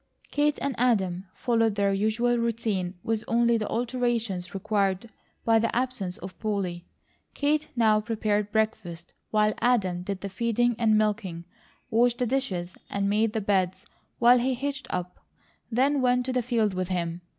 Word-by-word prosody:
Kate 295 0 +2
and 280 - 0
Adam 195 -7 +1
followed 225 -3 +1
their 200 -1 +2
usual 220 +4 +1
routine 220 -6 -1
with 225 -1 -1
only 235 0 +3
the 215 -2 -1
alterations 230 -6 -1
required 200 +2 0 0.3
by 225 -1 +5
the 230 +1 0
absence 240 -8 -1
of 185 +1 -10
Polly. 190 -5 -3 0.5
Kate 300 +1 +1
now 215 -3 +4
prepared 210 -2 -1
breakfast 180 -6 -2 0.2
while 215 0 +2
Adam 195 -8 +1
did 190 +1 -4
the 200 - -3
feeding 235 +4 +1
and 220 -2 +4
milking; 205 -6 -1 0.5
washed 240 +1 +3
the 250 - 0
dishes 200 -9 -2 0.2
and 200 0 0
made 215 +1 +2
the 220 - -1
beds 190 -2 0 0.3
while 245 +1 +6
he 255 +2 0
hitched 275 +1 -4
up; 180 0 -4 0.5
then 270 +4 +2
went 250 0 +2
to 260 - -2
the 250 - +2
field 225 -4 +1
with 185 -1 -2
him. 175 -1 -2
220 Hz, 160 wpm, -27 LUFS, 195-240 Hz, 0.5 s, while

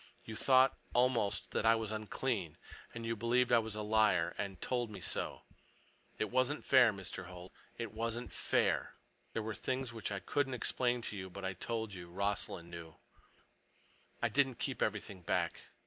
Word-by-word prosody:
You 110 - -6
thought, 130 +3 +5 0.2
almost, 120 -5 +2
that - - 0
I 115 0 +6
was 110 -1 -2
unclean. 110 - -2 0.3
And 115 -1 -6
you 115 0 0
believed 120 +3 +2
I 120 - +7
was 110 -1 -4
a 105 - -3
liar, 105 -5 +3
and 95 -2 -4
told 120 -2 -1
me 105 - -7
so. - - -3 0.7
It 105 - -1
wasn't 130 +4 +1
fair, 130 -4 +7
Mr. 95 -3 -6
Holt. 90 0 -10 0.3
It 115 -3 -4
wasn't 115 +2 -3
fair. - - +1 0.4
There 115 - -1
were 110 0 -3
things 130 +3 -2
which 110 -2 -4
I 100 - -1
couldn't 135 +7 0
explain 125 0 0
to 105 - -3
you, 95 -1 -5
but 95 +1 -7
I 95 - -1
told 110 +2 -3
you 90 -2 -8
Rossland 95 -2 -1
knew. 85 -2 -8 1.3
I - - +4
didn't 135 -3 +2
keep - - -3
everything 95 -2 -1
back. - - 0
110 Hz, 175 wpm, -35 LUFS, 100-120 Hz, 1.3 s, I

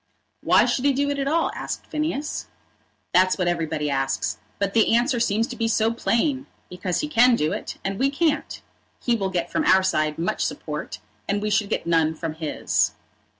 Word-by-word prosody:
"Why - - +5
should 260 - 0
he 280 - +4
do 285 +2 0
it 285 - -2
at 275 - -1
all?" 325 +3 +1
asked - - -5
Phineas. 305 -1 -3 0.7
"That's 185 +1 +4
what 180 -2 0
everybody 160 -3 -1
asks, 135 -1 -1 0.2
but 200 -1 -1
the 225 0 +4
answer 245 +1 +2
seems 225 -1 +1
to 250 - -6
be 230 -1 -1
so 225 0 +2
plain! 265 +4 0 0.2
Because 180 0 -2
he 300 - -2
can 250 -4 +5
do 155 -7 0
it, - - -5
and 195 0 -2
we 270 - +3
can't. 300 +2 -1 0.4
He 240 - +1
will 195 -4 -1
get 175 -2 -2
from 320 - 0
our 190 -10 +5
side 155 -4 0
much 165 +1 -1
support, 150 -8 -4 0.3
and 200 +1 0
we 210 +1 -2
should 205 -1 +1
get - - -2
none 165 -1 +2
from 160 0 -4
his." 155 -1 0
205 Hz, 195 wpm, -24 LUFS, 170-265 Hz, 0.7 s, Why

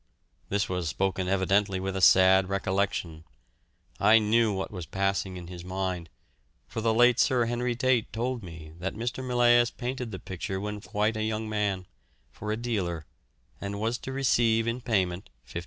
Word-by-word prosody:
This 100 0 0
was 90 -3 -2
spoken 95 +3 -1
evidently 95 +1 +2
with 95 0 -3
a 95 - -2
sad 95 0 +6
recollection. 95 -4 -1 0.8
I 110 +1 +6
knew 110 +1 +3
what 95 -1 -3
was 90 -5 -6
passing 95 -1 -1
in 90 - -8
his 85 0 -9
mind, 90 -2 -3 0.6
for 115 - -4
the 115 0 +2
late 120 +2 +5
Sir 125 -3 +3
Henry 120 +1 -1
Tate 125 -2 +1
told 120 +1 -2
me 80 -4 -10
that 95 +2 -3
Mr. 120 +4 -3
Millais 120 -1 +4
painted 125 0 -4
the 95 - -6
picture 95 +1 -5
when 105 +1 -5
quite 105 +2 -1
a 110 - -2
young 110 0 -2
man, 100 -3 -1 0.5
for 105 +9 -5
a 110 - -1
dealer, 95 -9 -2 0.6
and 100 0 -4
was 115 +3 -1
to 135 - -6
receive 120 -4 +2
in 115 +2 -2
payment 95 - -1 0.2
£50. 85 - -5
100 Hz, 170 wpm, -28 LUFS, 95-115 Hz, 0.8 s, sad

